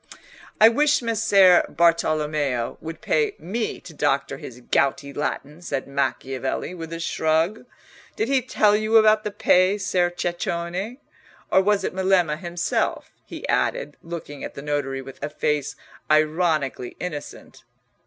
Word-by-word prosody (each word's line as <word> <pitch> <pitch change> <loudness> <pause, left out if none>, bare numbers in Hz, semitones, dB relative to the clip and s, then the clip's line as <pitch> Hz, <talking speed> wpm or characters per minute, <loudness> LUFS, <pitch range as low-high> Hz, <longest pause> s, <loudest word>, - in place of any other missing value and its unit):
"I 220 - +9
wish 290 +4 +3
Messer 205 -5 +5
Bartolommeo 150 -5 +1
would 165 0 -7
pay 440 -3 +1
me 220 +6 -3
to 165 - -12
doctor 145 -2 0
his 125 -1 -10
gouty 140 +3 0
Latin," 150 +2 -4
said 140 -6 -3
Macchiavelli, 135 +2 -2
with 165 -2 -8
a 165 - -5
shrug. 165 +6 0 0.5
"Did 435 - -1
he 270 -1 +2
tell 215 -4 +3
you 215 +1 +3
about 215 0 +5
the 210 - -2
pay, 195 -1 +3
Ser 180 -3 +1
Ceccone, 175 +5 -3 0.5
or 190 - +5
was 200 0 +2
it - - -2
Melema 185 -5 +2
himself?" 175 -1 -2 0.2
he - - -7
added, - - 0
looking 165 -4 -8
at - - -7
the 140 - -8
notary 140 -2 -2
with 135 0 -12
a 145 - -2
face 150 -1 -1 0.3
ironically 155 -4 +1
innocent. 150 -5 -7
170 Hz, 140 wpm, -23 LUFS, 145-200 Hz, 0.5 s, I